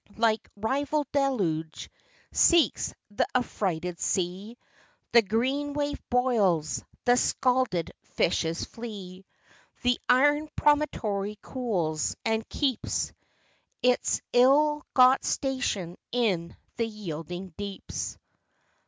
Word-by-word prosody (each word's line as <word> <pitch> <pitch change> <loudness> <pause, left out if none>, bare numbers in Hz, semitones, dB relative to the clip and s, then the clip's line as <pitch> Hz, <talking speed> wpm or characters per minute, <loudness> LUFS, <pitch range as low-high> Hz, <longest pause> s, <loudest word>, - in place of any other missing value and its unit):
Like 225 -1 +1
rival 280 +7 0
deluge, 190 - -1 0.4
seeks 335 - +4 0.2
th' - - 0
affrighted 180 -8 -1
sea; 190 +5 -2 0.5
The 235 - +7
green 260 +8 -1
wave 290 0 -2
boils, 195 - +2 0.2
the 245 - +5
scalded 250 - +1
fishes 165 -1 -1
flee. 195 -5 -9 0.6
The 245 0 +2
iron 290 +4 +4
promontory 215 -9 +1
cools, 180 - -1
and 225 0 0
keeps 265 -6 -1 0.7
Its 250 0 +2
ill 295 +4 +4
got 255 +1 +6
station 255 -10 -1
in 190 -9 0 0.2
the 230 -1 0
yielding 180 -3 -6
deeps. 200 -1 -5
225 Hz, 90 wpm, -27 LUFS, 185-260 Hz, 0.7 s, The